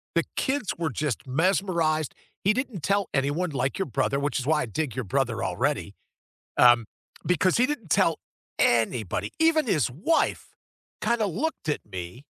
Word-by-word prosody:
The - - +3
kids 265 -6 0
were 165 -2 -1
just 140 -1 -3
mesmerized. 165 0 +1 0.3
He 200 +3 +4
didn't 245 - -3
tell 200 +1 +1
anyone 145 +6 0
like 135 -1 -1
your 195 - 0
brother, 135 +3 0
which 145 0 -1
is 125 - -4
why 155 -1 +3
I - - -1
dig 125 +2 -3
your 130 - -2
brother 115 0 -1
already, - - -1 0.7
um, 120 -2 +7 0.4
because 180 +1 +2
he 250 +2 +4
didn't 260 - -5
tell 165 -5 +3 0.4
anybody, 115 -4 +1
even 320 -3 +3
his 155 - +1
wife 180 - 0 0.5
kinda 235 -2 +1
looked 205 - -3
at 150 - 0
me 90 +9 -7
155 Hz, 160 wpm, -26 LUFS, 130-200 Hz, 0.7 s, um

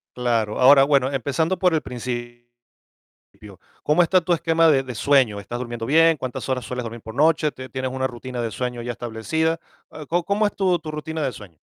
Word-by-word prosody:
Claro, 115 -4 -1
ahora, 135 +2 +7
bueno, 135 -2 +2
empezando 140 +6 -1
por 180 -3 +2
el 160 - +1
principio, 120 -1 -6 1.4
¿cómo 155 +4 +4
está 185 +2 +3
tu 175 0 0
esquema 165 0 +2
de 135 -3 +3
de 125 -2 -7
sueño? 130 -6 +2
¿Estás 120 +4 -6
durmiendo 120 -2 -5
bien? 165 +3 +4
¿Cuántas 130 0 -5
horas 125 -3 -1
sueles 125 +1 -4
dormir 115 0 -7
por 110 +1 -10
noche? 155 +1 +2
¿Te 130 0 -9
tienes 130 -1 -3
una 130 0 -2
rutina 125 0 -5
de 115 -1 -3
sueño 125 +2 -4
ya 120 +1 -4
establecida?, 120 +8 -2 0.3
ah, 155 - -9
¿có 175 +4 0
cómo 205 +3 +1
es 205 - -1
tu 185 -3 +1
tu 155 -1 -7
rutina 155 +1 -5
de 135 -3 -1
sueño? 100 -9 -13
130 Hz, 205 wpm, -22 LUFS, 120-160 Hz, 1.4 s, ahora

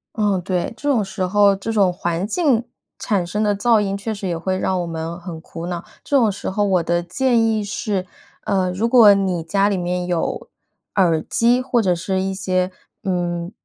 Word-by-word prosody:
嗯， 205 -4 +1
对， 180 -1 -2
这 290 - -2
种 240 -6 +3
时 190 -1 -3
候 200 +1 +4
这 210 +4 -4
种 200 -4 +3
环 175 +1 -2
境 250 -2 +1 0.3
产 195 -5 0
生 210 +5 -2
的 205 -1 +1
噪 225 +2 +3
音 195 -1 -1
确 210 +3 -4
实 200 -2 -4
也 170 - -1
会 185 +3 -2
让 190 0 0
我 175 - -4
们 165 +1 -5
很 170 -2 -8
苦 165 +1 -9
恼。 175 -1 -4 0.2
这 - - -3
种 225 -4 +3
时 200 - -4
候 205 +2 -1
我 185 -3 +2
的 170 +1 0
建 230 +7 +1
议 220 -2 +1
是， 200 -2 -2 0.4
呃， 190 -3 +1
如 205 +6 0
果 230 -4 +7
你 190 -4 0
家 195 +5 +1
里 200 - 0
面 180 0 -2
有， 175 -2 -2 0.5
耳 170 -5 +3
机 240 +7 +2
或 250 -2 +1
者 185 -5 +2
是 185 +2 -2
一 190 0 -2
些 185 -1 0 0.3
嗯， 175 -2 -2
190 Hz, 220 characters per minute, -20 LUFS, 175-210 Hz, 0.5 s, 果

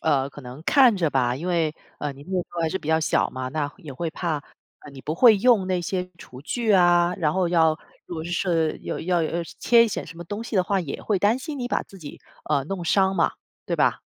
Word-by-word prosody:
呃， 140 -3 +1
可 145 - -11
能 130 +4 -10
看 255 -7 +5
着 165 -5 0
吧。 125 -2 +1
因 165 +6 -6
为， 165 -3 0 0.2
呃， 150 - -3
你 140 - -13
那 155 - -12
时 185 -2 -1
候 170 - -2
还 160 - +1
是 190 - -2
比 150 - -9
较 160 0 +4
小 155 - +1
嘛， 130 0 -5
那 145 0 -2
也 155 -8 -10
会 165 +6 -3
怕， 170 -2 -2 0.4
呃， 150 - -12
你 135 -1 -12
不 155 - -3
会 225 +2 +7
用 210 -2 +3
那 185 -1 0
些 180 +1 -3
厨 130 -6 -12
具 225 - -1
啊， 175 -1 +4
然 155 -1 +1
后 185 -2 +1
要 160 -2 +3 0.3
如 - - -7
果 160 -1 -5
是 170 -2 0
有 - - -4
要 175 0 +1
呃， 170 +1 -1
切 235 -1 +5
一 - - -1
些 - - -3
什 165 - -11
么 175 - -8
东 205 +6 -5
西 230 -3 -4
的 185 - +3
话， 195 0 0
也 150 -6 -6
会 205 -3 0
担 210 +6 +2
心 290 +2 -6
你 245 -1 -3
把 - - 0
自 195 - -15
己， 150 -4 -10 0.3
呃， 145 -3 +1
弄 180 +3 -4
伤 190 +3 +2
嘛， 170 - +2 0.3
对 - - -1
吧？ - - +2
175 Hz, 275 characters per minute, -24 LUFS, 155-190 Hz, 0.4 s, 会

